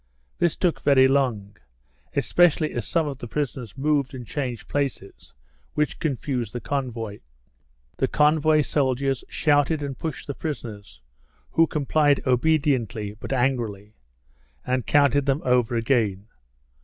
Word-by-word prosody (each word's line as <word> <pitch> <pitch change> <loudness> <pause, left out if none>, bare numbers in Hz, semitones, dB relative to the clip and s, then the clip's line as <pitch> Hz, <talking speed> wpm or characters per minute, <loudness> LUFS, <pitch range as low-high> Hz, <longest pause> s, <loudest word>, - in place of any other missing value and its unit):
This 175 -2 +2
took 180 -3 0
very 135 -2 +5
long, 125 -7 0 0.6
especially 165 -3 +3
as 115 -4 -4
some 165 -2 +1
of 140 -2 -5
the 120 - -7
prisoners 130 -3 -4
moved 140 -1 0
and 125 -2 -7
changed 125 -4 -4
places, 135 -9 -4 0.4
which 150 0 0
confused 130 -6 -2
the 120 - -3
convoy. 115 -7 -4 0.8
The 130 - +1
convoy 155 +2 +3
soldiers 135 -2 0
shouted 145 0 +2
and 140 -2 -4
pushed 160 -1 -5
the 140 - -4
prisoners 105 - -7 0.5
(who 165 0 +4
complied 145 -1 +2
obediently, 125 -6 +1
but - - -7
angrily) 120 -6 -1 0.7
and 125 -1 -1
counted 145 -1 +3
them 140 +3 +1
over 125 -2 +2
again. 115 -5 +1
135 Hz, 130 wpm, -24 LUFS, 120-145 Hz, 0.8 s, very